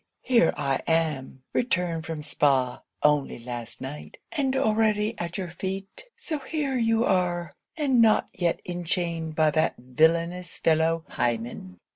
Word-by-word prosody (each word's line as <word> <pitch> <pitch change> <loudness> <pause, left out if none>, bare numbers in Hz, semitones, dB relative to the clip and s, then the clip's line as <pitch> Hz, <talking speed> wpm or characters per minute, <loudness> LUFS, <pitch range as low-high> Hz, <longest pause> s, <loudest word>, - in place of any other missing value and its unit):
here 235 -9 +4
I 135 -2 0
am! 150 -5 0
returned 175 -8 0
from 160 -2 -4
Spa 135 -4 +1 0.2
only 150 -2 +2
last 120 -1 -7
night; 140 +3 -7
and 275 -5 0
already 215 -3 +2
at 170 0 -3
your 185 -3 -3
feet. 195 - -5
So 310 -3 -4
here 280 0 -2
you 225 -1 +2
are? 175 -4 0 0.2
and 270 -6 +3
not 220 -1 +4
yet 175 -2 0
enchained 170 -2 -2
by 155 -1 +4
that 155 +2 +1
villainous 165 +7 +1
fellow 160 0 +2
Hymen? 115 -6 -3
170 Hz, 135 wpm, -26 LUFS, 150-215 Hz, 0.2 s, here